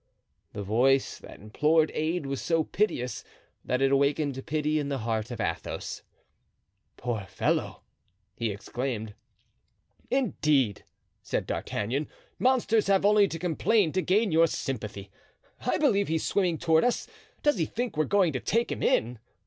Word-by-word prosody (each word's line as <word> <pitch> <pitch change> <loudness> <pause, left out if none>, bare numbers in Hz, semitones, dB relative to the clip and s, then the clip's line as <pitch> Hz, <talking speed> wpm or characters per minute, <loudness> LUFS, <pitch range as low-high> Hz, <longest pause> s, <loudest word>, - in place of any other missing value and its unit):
The 105 - -5
voice 130 +7 +2
that - - -12
implored 150 +10 +2
aid 160 0 -1
was 135 0 -3
so 165 -1 +1
piteous 125 - -1 0.4
that 125 +2 0
it 135 - +3
awakened 140 -1 +1
pity 155 0 0
in 145 -1 -3
the 140 - -1
heart 110 -2 -2
of 120 - -6
Athos. 85 -7 -4 1.0
"Poor 115 -5 -3
fellow!" - - -1 0.5
he 115 - -1
exclaimed. 110 +1 -4 1.0
"Indeed!" 150 - +1 0.4
said - - -2
D'Artagnan, 130 +8 -2 0.3
"monsters 240 -5 +2
have 195 0 +3
only 205 -1 +5
to 165 - -5
complain 180 +2 +2
to 185 - 0
gain 200 +3 +2
your 165 +1 +5
sympathy. 105 -9 -5 0.5
I - - +1
believe 210 -10 +2
he's 160 0 0
swimming 180 -5 +1
toward 160 0 +3
us. 245 - +1 0.4
Does 295 -9 +3
he 165 - +2
think 240 -4 -3
we 155 - +2
are - - -5
going 190 -6 +3
to 130 - -1
take 230 - 0
him - - -4
in? 120 0 +1
150 Hz, 150 wpm, -28 LUFS, 125-190 Hz, 1.0 s, only